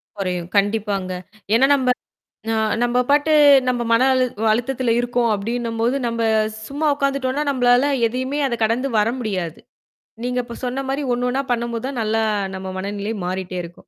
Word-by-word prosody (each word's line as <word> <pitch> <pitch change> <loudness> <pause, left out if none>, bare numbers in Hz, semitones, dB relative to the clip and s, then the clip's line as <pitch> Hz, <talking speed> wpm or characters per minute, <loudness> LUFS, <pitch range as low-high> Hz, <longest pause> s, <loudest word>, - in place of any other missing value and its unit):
குறையும். 180 -3 -3
கண்டிப்பாங்க. 200 -2 0 0.4
ஏன்னா 260 +4 +5
நம்ப 255 -2 0 0.6
ந - - +1 0.3
நம்ப 240 +1 +1
பாட்டு 290 +2 +3 0.4
நம்ம 245 -1 0
மன 230 +2 +4
அழு 255 -1 +3 0.2
அழுத்தத்தில 245 +1 0
இருக்கோம் 245 -1 +1
அப்டின்னும்போது, 230 +3 -1
நம்ப 230 -1 -2 0.5
சும்மா 290 +3 -2
உக்காந்துட்டோனா, 275 0 -1
நம்மளால 250 +1 +3 0.2
எதையுமே 260 +5 -2
அத 240 - -1
கடந்து 235 +5 +1
வர 210 +2 +3
முடியாது. 185 -8 -3 0.6
நீங்க 250 0 -1
இப்ப 235 -1 -9
சொன்ன 255 +2 -2
மாரி 275 +2 -1
ஒண்ணு 245 +1 0
ஒண்ணா 270 +2 0
பண்ணும்போது 235 -1 -2
தான் 260 -4 -4
நல்லா 220 +1 0 0.3
நம்ம 190 0 -6
மனநிலை 205 +3 -3
மாறிட்டே 185 0 -4
இருக்கும். 170 0 -10
240 Hz, 150 wpm, -21 LUFS, 210-255 Hz, 0.6 s, ஏன்னா